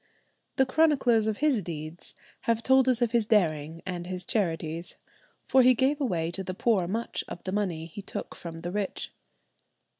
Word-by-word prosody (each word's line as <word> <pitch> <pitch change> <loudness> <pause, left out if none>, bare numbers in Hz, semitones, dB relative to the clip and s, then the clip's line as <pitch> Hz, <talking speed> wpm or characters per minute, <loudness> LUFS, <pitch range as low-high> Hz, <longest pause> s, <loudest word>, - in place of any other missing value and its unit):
The 265 - +4
chroniclers 260 -6 +3
of 215 -1 -1
his 270 -8 +3
deeds 160 -1 -7 0.3
have 230 0 +2
told 265 0 +5
us 245 -1 +3
of 235 - 0
his 235 -3 +2
daring 165 -6 +1
and 175 -2 -4
his 180 -1 -5
charities, 165 -4 -1 0.5
for 260 - +5
he 255 0 +6
gave 275 +5 +1
away 170 -10 0
to 190 +2 -3
the 185 0 -5
poor 200 -4 +2
much 225 +5 -2
of 175 - -8
the 185 - -3
money 185 -6 -1
he 170 +5 -8
took - - -6
from 165 -1 -8
the 175 +1 -4
rich." 200 0 -3
195 Hz, 180 wpm, -28 LUFS, 170-240 Hz, 0.5 s, he